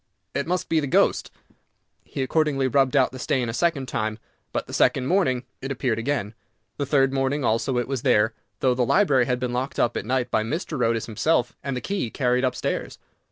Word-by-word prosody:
It - - -2
must 180 +1 -1
be 160 - +2
the 145 - -2
ghost." - - +2 0.7
He 135 - -4
accordingly 140 -1 +1
rubbed 135 +1 +2
out 130 -2 +4
the 130 - -9
stain 125 -2 0
a - - -3
second 145 -2 0
time, 110 -3 -2 0.3
but - - -2
the - - -11
second 130 - +3
morning 130 -7 +1 0.2
it 135 - -4
appeared 125 -4 -1
again. 115 -4 -2 0.4
The 140 - -2
third 135 -1 +3
morning 135 +1 0
also 115 +3 +1
it 120 - 0
was 135 -3 -2
there, 110 +2 +3 0.3
though 130 -1 +3
the 125 - -1
library 135 - +3
had 125 -1 0
been 125 -1 -2
locked 130 +2 -3
up 120 - +1
at - - -2
night 130 0 0
by - - +2
Mr. 150 +1 -2
Otis 115 -1 +1
himself, 120 +3 0
and 140 -2 -2
the - - -4
key 195 - -2
carried 125 0 +1
up 125 -1 +1
stairs. - - -3
130 Hz, 210 wpm, -24 LUFS, 120-140 Hz, 0.7 s, out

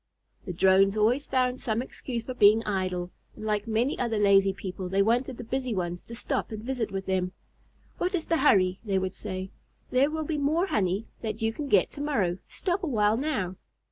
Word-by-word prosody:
The - - -2
Drones 190 +3 +4
always 240 +7 +2
found 255 -1 0
some 220 -1 -1
excuse 240 -2 -5
for 255 - -5
being 220 -1 +5
idle, 185 -3 -2 0.2
and 215 - -8
like 210 0 -1
many 230 +5 0
other 235 -3 0
lazy 195 -1 +5
people 185 -1 -6
they 195 +1 +3
wanted 245 +3 +1
the - - -6
busy 250 0 -2
ones 175 -1 -3
to 230 - -10
stop 230 - -2
and 215 -1 -6
visit 245 -3 -2
with 195 0 -4
them. 185 -1 -1 0.7
"What 365 +2 0
is 330 - -2
the 330 - +1
hurry?" 190 -10 +4
they 200 -4 0
would 190 0 -1
say. 185 -2 -6 0.4
"There 265 +3 +4
will 315 0 -2
be 300 -1 -2
more 310 +6 +2
honey 200 - 0 0.2
that 220 -1 -4
you 225 0 +1
can 290 +4 -5
get 200 -8 +3
to 285 - -5
morrow. 200 -12 0
Stop 375 0 -2
a 355 - -2
while 215 -5 +2
now." 225 - -2
220 Hz, 205 wpm, -27 LUFS, 190-260 Hz, 0.7 s, being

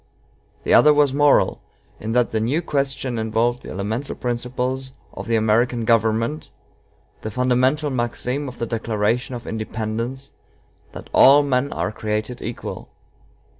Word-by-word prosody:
The - - +1
other 150 0 +7
was 145 -2 +3
moral, 145 0 +3 0.4
in 110 +1 -4
that 125 -1 +2
the 110 - 0
new 135 +10 0
question 135 -5 -2
involved 115 +2 0
the - - -10
elemental 110 +8 -4
principles 125 +2 -3 0.2
of - - -7
the 115 - +1
American 115 +2 +2
government, 115 +5 +1 0.7
the 110 - -4
fundamental 130 +5 +1
maxim 125 +3 -2
of 125 - -8
the 115 - -2
Declaration 115 +2 -1
of 120 - -8
Independence, 110 +4 -4 0.6
that - - -10
all 140 +2 +7
men 140 0 0
are - - -2
created 110 +3 -3
equal. 115 +1 -6
120 Hz, 135 wpm, -22 LUFS, 110-130 Hz, 0.7 s, other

